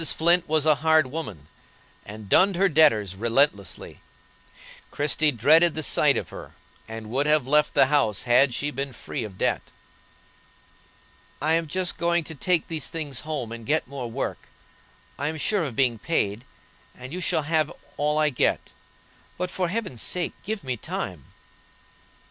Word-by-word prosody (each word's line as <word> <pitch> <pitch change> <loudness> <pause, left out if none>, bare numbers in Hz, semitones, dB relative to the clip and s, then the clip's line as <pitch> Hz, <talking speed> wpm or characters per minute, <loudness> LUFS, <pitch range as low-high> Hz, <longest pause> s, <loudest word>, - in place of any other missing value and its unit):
Flint 170 +1 +2
was 155 -1 +2
a 155 - +6
hard 160 -1 +4
woman, 110 - -6 0.6
and 105 0 -9
dunned 190 - +4
her 195 +3 +3
debtors 140 - +3
relentlessly; 115 -2 0 0.9
Christie 150 +1 +1
dreaded 155 +7 +4
the 155 - -3
sight - - +3
of - - -4
her, - - -10 0.3
and 110 -1 -8
would 140 +4 0
have 150 -3 +3
left 150 +2 +2
the - - +6
house 130 -8 +1
had 125 +2 +4
she 145 +5 -2
been 135 0 -4
free - - -5
of 100 -4 -9
debt. - - +1 1.8
"I 155 +3 +1
am 165 0 +1
just 180 +3 -2
going 170 0 +1
to 160 - -7
take 170 +2 0
these 160 -4 -3
things 150 -6 -5
home 150 -7 -4
and 115 0 -7
get 150 +7 0
more 130 -3 -6
work. 130 +4 -4 0.7
I 145 - 0
am 160 +1 -3
sure 195 +4 +1
of 130 -6 -5
being 120 -4 +1
paid, 110 -5 -1 0.5
and 130 +3 -9
you 180 - -4
shall 165 -3 0
have 155 0 +1 0.2
all 150 +1 0
I 155 -1 +3
get. 125 - 0 0.7
But, 180 0 -3
for 185 -1 -1
Heaven's 185 - -3
sake, 180 -1 -1
give 215 -2 -4
me 130 -2 -3
time." - - -5
150 Hz, 165 wpm, -25 LUFS, 120-160 Hz, 1.8 s, a